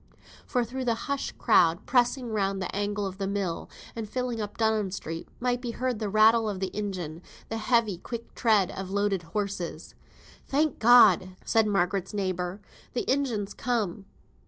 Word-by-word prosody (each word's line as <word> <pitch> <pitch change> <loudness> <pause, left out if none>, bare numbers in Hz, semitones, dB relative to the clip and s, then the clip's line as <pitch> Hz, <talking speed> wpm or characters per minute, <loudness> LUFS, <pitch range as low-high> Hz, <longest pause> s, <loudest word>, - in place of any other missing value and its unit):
For 245 -1 +1
through 255 +3 -5
the 235 -2 +2
hushed 280 -1 -3
crowd, 175 -7 +4
pressing 245 -1 +2
round 195 -2 0
the 185 - -4
angle 205 0 -1
of 190 0 -6
the 195 - -1
mill, 195 -4 -2 0.3
and 225 -2 -5
filling 250 -2 -2
up 205 -1 -6
Dunham 220 -3 +1
Street, 165 -3 -6
might 245 0 0
be 245 - -4
heard 250 -3 -1
the 215 -2 -2
rattle 220 +2 +5
of 195 -2 -4
the 190 0 -3
engine, 180 -6 -4 0.3
the 225 - -2
heavy, 225 -5 +1
quick 235 +4 -7
tread 215 -6 +3
of 190 -1 -6
loaded 200 -1 0
horses. 180 -2 -4 0.5
"Thank 295 +1 +1
God!" 205 -6 +6
said 225 -2 +3
Margaret's 195 0 0
neighbour, 185 -1 -2 0.3
"the 245 - -2
engine's 240 -7 0
come." 210 -6 -2
210 Hz, 165 wpm, -27 LUFS, 190-235 Hz, 0.5 s, God